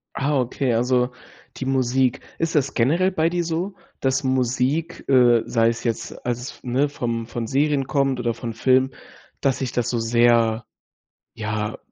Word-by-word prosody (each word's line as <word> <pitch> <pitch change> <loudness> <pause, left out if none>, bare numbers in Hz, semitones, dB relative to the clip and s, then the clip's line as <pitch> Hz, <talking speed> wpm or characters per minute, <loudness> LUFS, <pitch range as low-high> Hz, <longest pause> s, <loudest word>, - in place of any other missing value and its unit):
Ah, 140 0 +1
okay, 125 0 0
also 125 +1 +2 0.5
die 130 - -4
Musik. 130 -1 +1 0.2
Ist 165 -1 -1
das 140 -1 +1
generell 165 +10 +2
bei 165 -1 +1
dir 175 0 -1
so, 170 +4 -3 0.2
dass 135 +1 0
Musik, 130 +5 0
äh, 120 -4 +5
sei 115 -1 +2
es 115 0 -4
jetzt, 115 -2 -4
als 120 -1 -1
es 130 - -6
f - - -19
ne, 130 +4 +1
vom 115 -4 -3
von 120 -1 -4
Serien 140 0 +1
kommt 135 -1 0
oder 120 -1 0
von 115 0 -6
Filmen, 130 +3 +3 0.5
dass 135 -2 +1
dich 130 -2 -2
das 120 - -1
so 120 - 0
sehr, 115 -1 +3 0.7
ja, 105 -1 -3
130 Hz, 170 wpm, -23 LUFS, 120-140 Hz, 0.7 s, äh